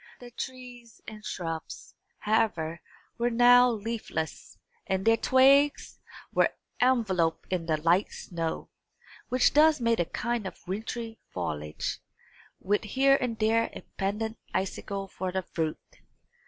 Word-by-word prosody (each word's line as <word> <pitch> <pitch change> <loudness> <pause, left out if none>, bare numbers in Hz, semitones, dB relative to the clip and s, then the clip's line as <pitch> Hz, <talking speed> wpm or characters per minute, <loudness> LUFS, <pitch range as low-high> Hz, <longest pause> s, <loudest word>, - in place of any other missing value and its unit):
The 245 -1 -12
trees 245 -2 -8
and 215 -1 -9
shrubs, 165 -5 -6 0.2
however, 185 -7 0 0.4
were 240 +1 +2
now 245 +1 +6
leafless, 220 -8 -4 0.3
and 190 0 -1
their 225 0 +6
twigs 275 +4 +4 0.3
were - - +4 0.3
enveloped 190 -11 +1
in 170 -2 -2
the 155 -2 +2
light 170 +5 +2
snow, 165 -2 -5 0.6
which 255 0 +3
thus 305 0 +5
made 230 -1 +1
a 175 - +2
kind 235 +2 -2
of 190 - -11
wintry 225 +3 -5
foliage, 75 -4 -4 0.6
with 205 +3 0
here 270 +5 +4
and 240 -3 -2
there 225 +1 +2
a - - -8 0.2
pendent 215 +3 -2 0.2
icicle 195 +1 -3
for 185 -1 -4
the 190 0 -2
fruit. 160 -2 -5
220 Hz, 125 wpm, -28 LUFS, 180-240 Hz, 0.6 s, now